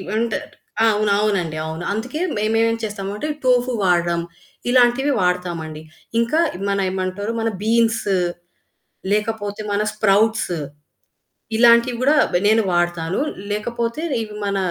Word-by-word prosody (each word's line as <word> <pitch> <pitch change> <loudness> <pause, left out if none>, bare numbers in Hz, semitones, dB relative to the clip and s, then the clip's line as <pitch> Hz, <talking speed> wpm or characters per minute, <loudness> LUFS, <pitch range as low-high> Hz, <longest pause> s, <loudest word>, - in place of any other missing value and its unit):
అంటే 225 -2 0 0.5
అవును. 210 -1 +2
అవునండవును. 165 -5 -1
అందుకే 250 +9 -4 0.2
మేమేం 225 +2 +2
చేస్తాము 200 -2 -4
అంటే 300 - -3 0.2
టోఫు 250 0 +3
వాడడం, 170 -1 +2 0.5
ఇలాంటివి 250 +3 +4
వాడతామండి. 175 -4 -2 0.4
ఇంకా 235 +8 +1 0.3
మన 200 - +1
ఏమంటారు, 190 +3 -3
మన 225 - 0
బీన్స్ 225 0 +2 1.1
లేకపోతే 210 -1 -1
మన 205 - +1
స్ప్రౌట్స్. 215 -1 +2 1.0
ఇలాంటివి 235 +1 +5
గూడా 295 +3 +4 0.2
బ - - +2
నేను 220 +1 +4
వాడతాను 175 +1 0 0.3
లేకపోతే 235 +6 -2 0.2
ఇవి 210 -1 -8
మన 200 - -1
215 Hz, 110 wpm, -21 LUFS, 185-235 Hz, 1.1 s, ఇలాంటివి